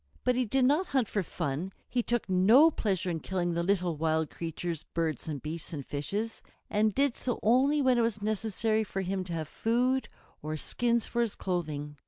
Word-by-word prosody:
But 250 - +3
he 255 0 +1
did 260 +3 +2
not 300 +8 +3
hunt 245 -5 +2
for 205 - -1
fun; 165 +1 -3
he 250 - 0
took 240 -2 -1
no 215 - +6
pleasure 190 - -1
in 165 - -2
killing 175 0 -1
the 170 - 0
little 180 -2 +1
wild 160 0 0
creatures, 165 -1 -4
birds 165 -2 -3
and 150 -3 -3
beasts 160 +2 -5
and 140 -4 -5
fishes, 205 +11 -3 0.3
and 210 0 +2
did 275 -2 +2
so 245 - -2
only 270 +6 +4
when 255 -2 +4
it - - +4
was 230 -2 0
necessary 220 +1 0
for 195 -2 -4
him 190 0 -2
to 175 - -5
have 160 -2 -3
food 250 - 0 0.3
or 155 +1 -3
skins 235 +7 0
for 240 - -1
his 230 -3 0
clothing. 150 -5 -3
195 Hz, 200 wpm, -30 LUFS, 165-235 Hz, 0.3 s, no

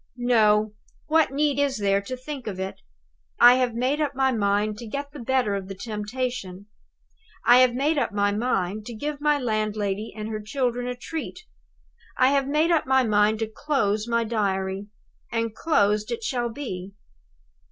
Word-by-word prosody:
No! 215 -3 +3 0.3
What 320 0 +3
need 285 0 0
is 280 -3 +1
there 200 -1 +1
to 255 +6 -6
think 260 -1 -7
of 190 -3 -4
it? 190 0 -5 0.6
I 245 +1 +8
have 250 -3 0
made 260 +5 0
up 285 -2 -1
my 265 0 +2
mind 210 -1 0
to 235 - -8
get 280 +5 -5
the 290 - -10
better 250 -3 +1
of 195 -1 -4
the 195 - -7
temptation. 210 -2 -4 0.8
I 245 +1 +7
have 255 -1 +4
made 290 +4 +1
up 255 - -1
my 205 0 +1
mind 210 -2 -1
to 240 - -6
give 290 +5 -4
my 295 0 +3
landlady 215 -4 -2
and 215 0 -4
her 215 -1 -4
children 245 +2 -2
a 250 - -3
treat; 315 - -6 0.8
I 255 0 +5
have 275 -1 +1
made 305 +4 +2
up 325 -5 +2
my 265 0 +4
mind 210 -1 +3
to 225 - 0
close 220 -4 -1
my 235 0 +1
Diary. 195 -3 -2 0.4
And 230 -1 -1
closed 210 -8 +1
it 460 -1 -4
shall 245 - -1
be. 200 -8 -6
235 Hz, 175 wpm, -25 LUFS, 210-265 Hz, 0.8 s, I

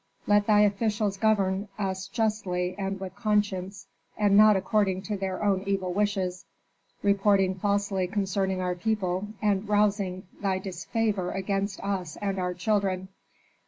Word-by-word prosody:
Let 205 0 +3
thy 210 -1 +5
officials 210 -1 +1
govern 200 -2 +1
us 190 -2 -3
justly 200 -6 -1
and 195 -1 -3
with 190 -1 -7
conscience, 200 -3 -1 0.3
and 205 -2 +3
not 215 0 +7
according 190 -1 +1
to 210 +1 -3
their 190 0 -3
own 195 -2 +2
evil 190 -2 -1
wishes, 195 -3 -1 0.6
reporting 200 -1 +3
falsely 200 -1 0
concerning 190 -1 -1
our 180 0 0
people, 185 0 -1 0.2
and 205 0 +1
rousing 200 -3 +1 0.2
thy 195 -2 +1
disfavor 190 +1 -2
against 195 +1 -2
us 190 -5 -3
and 195 -2 -2
our 180 -1 -2
children. 190 -1 0
195 Hz, 135 wpm, -27 LUFS, 185-205 Hz, 0.6 s, not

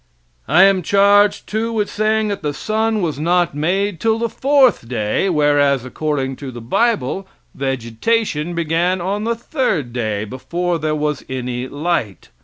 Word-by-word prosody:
I 180 - +6
am 195 -1 +4
charged, 200 +3 +3
too, 220 +2 -2
with 215 -2 0
saying 215 0 0
that 200 - -3
the 145 -2 -3
sun 220 +1 -1
was 155 -5 -2
not 175 +2 +1
made 180 +5 -1
till 225 -1 +1
the 230 0 -1
fourth 270 - +3
day, 110 - 0
whereas, 145 -5 +2
according 135 -1 -2
to 140 - -7
the 120 -1 -8
bible, 195 - 0 0.3
vegetation 145 - -1
began 170 +3 0
on 200 +4 -2
the 235 0 0
third 225 - -2
day, 110 -4 -2
before 170 - -3
there 155 0 -1
was 150 -2 -2
any 125 -1 -3
light. 145 - -3
170 Hz, 155 wpm, -19 LUFS, 135-205 Hz, 0.3 s, I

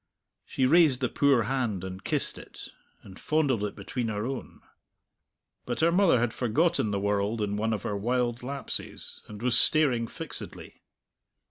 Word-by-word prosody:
She 130 - 0
raised 150 -2 +5
the 125 -3 0
poor 140 -5 +3
hand 115 -7 -1
and 95 +1 -7
kissed - - -1
it, - - -11 0.3
and 95 -1 -13
fondled 145 -8 +1
it 105 - -3
between 125 -3 -4
her 105 0 -2
own. 135 +1 -6 1.1
But 120 +4 -2
her 165 +1 +4
mother 175 -7 +4
had 120 -1 0
forgotten 145 +2 +1
the 100 -1 -1
world 100 +2 0
in 105 -1 -1
one 110 +2 0
of 110 - -2
her 105 - -2
wild 120 +3 -1
lapses, 140 +3 -5
and 105 +1 -9
was 125 -1 +5
staring 130 -7 +3
fixedly. - - -8
120 Hz, 160 wpm, -28 LUFS, 105-135 Hz, 1.1 s, raised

